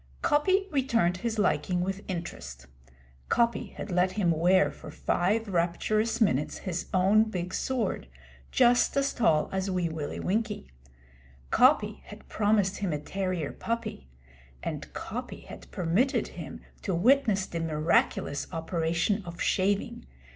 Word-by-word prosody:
Coppy 375 Hz, +7 st, +3 dB
returned 235 Hz, -, +2 dB
his 225 Hz, +3 st, -3 dB
liking 180 Hz, -3 st, +1 dB
with 195 Hz, +2 st, -2 dB
interest. 65 Hz, -, -6 dB, 0.6 s
Coppy 235 Hz, -3 st, +2 dB
had -, -, -6 dB
let 180 Hz, +1 st, +2 dB
him 190 Hz, -5 st, +2 dB
wear 180 Hz, +4 st, +3 dB
for -, -, -11 dB
five 215 Hz, +6 st, 0 dB
rapturous 205 Hz, +6 st, 0 dB
minutes 150 Hz, -, +1 dB
his 180 Hz, -3 st, -4 dB
own 195 Hz, +4 st, +4 dB
big 185 Hz, -4 st, -4 dB
sword 240 Hz, -, -1 dB, 0.4 s
just 245 Hz, -, +4 dB
as 275 Hz, 0 st, +1 dB
tall 160 Hz, -10 st, +3 dB
as 190 Hz, 0 st, -1 dB
Wee 180 Hz, -2 st, 0 dB
Willie 155 Hz, -2 st, -4 dB
Winkie. 210 Hz, -, -2 dB, 0.8 s
Coppy -, -, +4 dB
had -, -, -12 dB
promised 205 Hz, -2 st, +1 dB
him 195 Hz, -4 st, -2 dB
a 150 Hz, -, 0 dB
terrier 185 Hz, 0 st, -3 dB
puppy; 230 Hz, -, -4 dB, 0.6 s
and -, -, -5 dB
Coppy -, -, -6 dB
had -, -, -12 dB
permitted 185 Hz, +11 st, +1 dB
him -, -, -8 dB, 0.2 s
to 190 Hz, -, -1 dB
witness 215 Hz, -1 st, +3 dB
the 170 Hz, -, -5 dB
miraculous 155 Hz, -2 st, +1 dB
operation 170 Hz, +4 st, 0 dB
of 170 Hz, 0 st, -9 dB
shaving. 195 Hz, -, 0 dB
190 Hz, 135 wpm, -28 LUFS, 170-220 Hz, 0.8 s, own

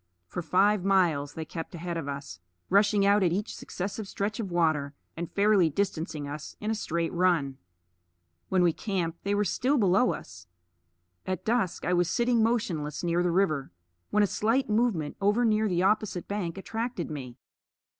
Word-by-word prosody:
For 135 Hz, -, -5 dB
five 195 Hz, +4 st, +3 dB
miles 170 Hz, -7 st, +2 dB
they 160 Hz, -, -4 dB
kept 165 Hz, +3 st, -7 dB
ahead 170 Hz, +1 st, -4 dB
of 165 Hz, -4 st, -4 dB
us, 140 Hz, -9 st, -6 dB, 0.3 s
rushing 200 Hz, 0 st, +4 dB
out 200 Hz, +1 st, +4 dB
at 180 Hz, -3 st, +3 dB
each 205 Hz, +5 st, -2 dB
successive 200 Hz, +3 st, -5 dB
stretch 205 Hz, +4 st, -3 dB
of 210 Hz, -4 st, -3 dB
water, 155 Hz, -5 st, +1 dB, 0.2 s
and 170 Hz, 0 st, -5 dB
fairly 200 Hz, -4 st, +4 dB
distancing 160 Hz, -4 st, -2 dB
us 145 Hz, +1 st, -7 dB
in 215 Hz, +1 st, -2 dB
a -, -, +2 dB
straight 170 Hz, -5 st, -2 dB
run. 170 Hz, -7 st, +1 dB, 0.9 s
When 185 Hz, -1 st, +3 dB
we 170 Hz, -2 st, +4 dB
camped 175 Hz, -5 st, -3 dB
they 200 Hz, +1 st, 0 dB
were 205 Hz, -, +2 dB
still 260 Hz, +9 st, +1 dB
below 205 Hz, +2 st, +4 dB
us. 90 Hz, +1 st, -10 dB, 0.8 s
At 185 Hz, -2 st, -3 dB
dusk 225 Hz, -5 st, 0 dB
I 180 Hz, -, +1 dB
was 175 Hz, -1 st, +2 dB
sitting 235 Hz, +3 st, +2 dB
motionless 185 Hz, -, -1 dB
near 170 Hz, 0 st, +1 dB
the 175 Hz, -, +1 dB
river 165 Hz, -6 st, +1 dB, 0.4 s
when 210 Hz, -, +3 dB
a -, -, +5 dB
slight 230 Hz, +7 st, +1 dB
movement 210 Hz, -9 st, 0 dB
over 210 Hz, +5 st, +3 dB
near 215 Hz, -1 st, +2 dB
the 180 Hz, 0 st, +1 dB
opposite 200 Hz, -2 st, +1 dB
bank 195 Hz, -4 st, -3 dB
attracted 225 Hz, -3 st, -4 dB
me. 130 Hz, -4 st, -7 dB
185 Hz, 175 wpm, -28 LUFS, 165-210 Hz, 0.9 s, a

